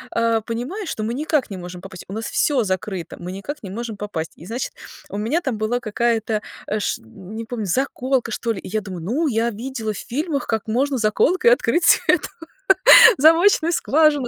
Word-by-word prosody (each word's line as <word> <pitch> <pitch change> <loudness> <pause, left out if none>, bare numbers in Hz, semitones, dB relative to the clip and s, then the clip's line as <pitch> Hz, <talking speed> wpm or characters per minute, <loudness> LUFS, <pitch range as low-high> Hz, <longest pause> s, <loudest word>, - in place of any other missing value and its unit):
э, 230 -1 +2
понимаю, 255 - -5
что 215 - -4
мы 225 +2 -2
никак 295 -2 -1
не 195 - -5
можем 180 0 -8
попасть, 185 -2 -10
у 195 - -8
нас 220 +2 -4
всё 275 -5 +1
закрыто, 185 -2 -4
мы 180 +1 -6
никак 280 +11 -7
не 195 - -8
можем 225 +3 -5
попасть. 165 -6 -5
И, 165 - -13
значит, 240 +5 -4 0.4
у - - -4
меня 235 +12 0
там 260 -8 -2
была 220 +3 0
какая-то, 225 -1 -1 0.4
ш 205 - -2
не 195 - -9
помню, 225 -2 -4
заколка 260 +3 -1
что 230 +1 -2
ли. 195 - -7
И - - -10
я 215 +3 -1
думаю, 185 -4 -7
ну, 270 - 0
я 235 -2 0
видела 225 -1 -4
в - - -8
фильмах, 290 - -3
как 220 -1 -2
можно 265 +5 0
заколкой 310 - +3
открыть 340 -8 +3
эту - - +3 0.9
замочную 330 +3 +5
скважину. 300 -4 +2
230 Hz, 190 wpm, -21 LUFS, 210-275 Hz, 0.9 s, замочную